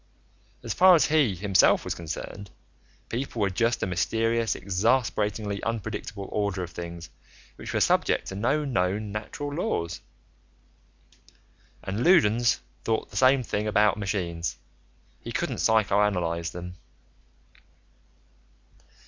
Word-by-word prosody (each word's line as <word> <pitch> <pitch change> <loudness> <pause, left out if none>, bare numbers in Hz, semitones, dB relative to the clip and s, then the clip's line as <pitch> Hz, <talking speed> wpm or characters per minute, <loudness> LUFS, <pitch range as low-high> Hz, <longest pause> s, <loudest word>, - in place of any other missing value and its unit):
As - - -3
far 185 0 +7
as 160 - +4
he, 150 -10 +2
himself, 95 +1 +3
was - - -2
concerned, 85 +4 -7 0.6
people 120 0 -4
were 100 -2 +1
just 115 +4 0
a - - +2
mysterious, 115 +6 0
exasperatingly 105 0 0
unpredictable 105 -2 -4
order 100 -3 -1
of 85 - -7
things 85 -2 -8 0.4
which - - -7
were - - 0
subject - - +2
to 95 - -6
no 140 +9 0
known 105 -4 -1
natural 130 +7 -5
laws. 85 - -2 1.8
And 100 +5 -3
Loudons 120 - +4 0.2
thought 110 -1 -1
the - - -13
same 130 0 +4
thing 105 -2 -2
about 105 -1 +3
machines: 90 -5 -3 0.6
he - - -8
couldn't - - -2
psychoanalyze 100 -6 +1
them. 90 0 -7
105 Hz, 115 wpm, -26 LUFS, 90-115 Hz, 1.8 s, far